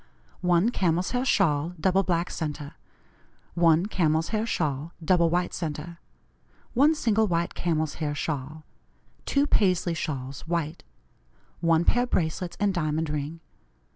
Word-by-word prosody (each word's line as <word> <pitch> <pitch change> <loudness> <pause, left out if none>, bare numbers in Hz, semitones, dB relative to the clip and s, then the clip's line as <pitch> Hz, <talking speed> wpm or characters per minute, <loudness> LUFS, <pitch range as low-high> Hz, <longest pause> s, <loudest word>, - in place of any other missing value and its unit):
"1 180 +4 +3
Camel's 180 -4 0
hair 250 0 0
shawl, 170 - +1
double 190 +4 +3
black 175 -2 -1
centre. 150 -3 -4 0.8
1 170 0 +4
Camel's 160 -5 +1
hair 220 +1 -1
shawl, 150 -3 -2
double 170 -1 +4
white 175 +1 0
centre. 165 +1 -5 0.7
1 290 +6 +4
Single 220 -6 +2
white 170 -2 0
camel's 160 -3 -1
hair 145 -1 -1
shawl. 150 +1 -4 0.6
2 280 0 +2
Paisley 185 -9 +2
shawls 140 -4 -4
white. 165 -2 -2 0.8
1 165 0 +3
Pair 245 +1 +3
bracelets 170 -2 -1
and 205 -1 +2
diamond 155 -2 -1
ring. 150 +2 -4
170 Hz, 130 wpm, -26 LUFS, 155-185 Hz, 0.8 s, 1